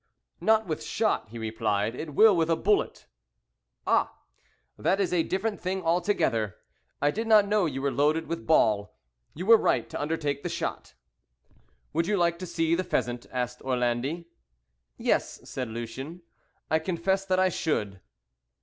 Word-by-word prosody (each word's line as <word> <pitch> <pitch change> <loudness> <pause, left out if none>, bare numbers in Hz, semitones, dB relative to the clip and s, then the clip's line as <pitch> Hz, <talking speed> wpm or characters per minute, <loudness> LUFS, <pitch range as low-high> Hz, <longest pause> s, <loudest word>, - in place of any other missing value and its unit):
"Not 220 0 +3
with 160 -4 -3
shot," 215 - 0
he 115 - -9
replied; 110 -1 -1
"it 150 +2 -7
will 215 -2 +7
with 165 -1 +1
a 165 - +4
bullet." 415 - 0 0.8
"Ah! - - +2 0.6
that 195 - +1
is 190 -2 0
a 175 - +3
different 205 +5 -2
thing 185 +1 -2
altogether. 165 - +1 0.4
I 145 +1 +2
did 225 +7 -3
not 215 -2 +6
know 205 -3 +2
you 135 -2 -4
were 140 - +1
loaded 155 +4 +1
with 170 0 -5
ball. 105 -9 +2 0.4
You 180 - -5
were 230 +2 +8
right - - +1
to - - -4
undertake 145 -2 -2
the - - -3
shot." - - -4 1.0
"Would 165 +2 +1
you 210 0 +1
like 170 -1 +1
to 185 - -5
see 165 -1 0
the 180 +2 +1
pheasant?" 120 -7 -2
asked 125 -1 -3
Orlandi. 130 +6 -1 0.7
"Yes," - - -1
said 130 -2 -4
Lucien, 130 +9 -7 0.5
"I 160 - +4
confess 185 +3 0
that 185 -1 +1
I 185 0 +4
should." 105 - -2
165 Hz, 160 wpm, -27 LUFS, 125-185 Hz, 1.0 s, were